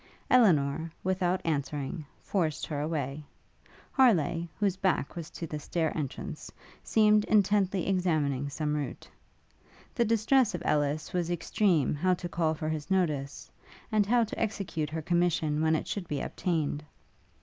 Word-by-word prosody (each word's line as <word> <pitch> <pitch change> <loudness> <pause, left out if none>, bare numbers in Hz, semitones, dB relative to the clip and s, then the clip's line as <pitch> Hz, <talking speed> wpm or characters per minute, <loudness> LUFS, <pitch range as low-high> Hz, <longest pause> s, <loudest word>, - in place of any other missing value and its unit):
Elinor, 160 - +4
without 185 0 0
answering, 145 -1 -2 0.2
forced 165 -6 -1
her 145 -2 -3
away. 150 -2 -3 0.7
Harleigh, 170 - +3
whose 200 -3 +2
back 185 -7 0
was 165 -3 -6
to 170 - -6
the 150 -1 -5
stair 160 +2 -1
entrance, 155 +3 -5 0.3
seemed 210 -1 +4
intently 200 -3 +2
examining 155 -8 0
some 150 +1 -2
route. 145 -2 -4 0.9
The 240 - +2
distress 230 0 +3
of 170 - -5
Ellis 150 +3 0
was 175 -2 0
extreme 175 - +1
how 180 +5 +2
to 175 - -5
call 160 -2 0
for 155 0 -3
his 155 0 -4
notice, 150 -7 -1 0.4
and 210 -2 +2
how 240 +2 +4
to 220 - -5
execute 195 -8 -2
her 160 0 -4
commission 165 -3 +1
when 160 0 +3
it - - -3
should 190 -4 -4
be 145 -3 -2
obtained. 155 -4 -2
165 Hz, 145 wpm, -29 LUFS, 150-190 Hz, 0.9 s, Elinor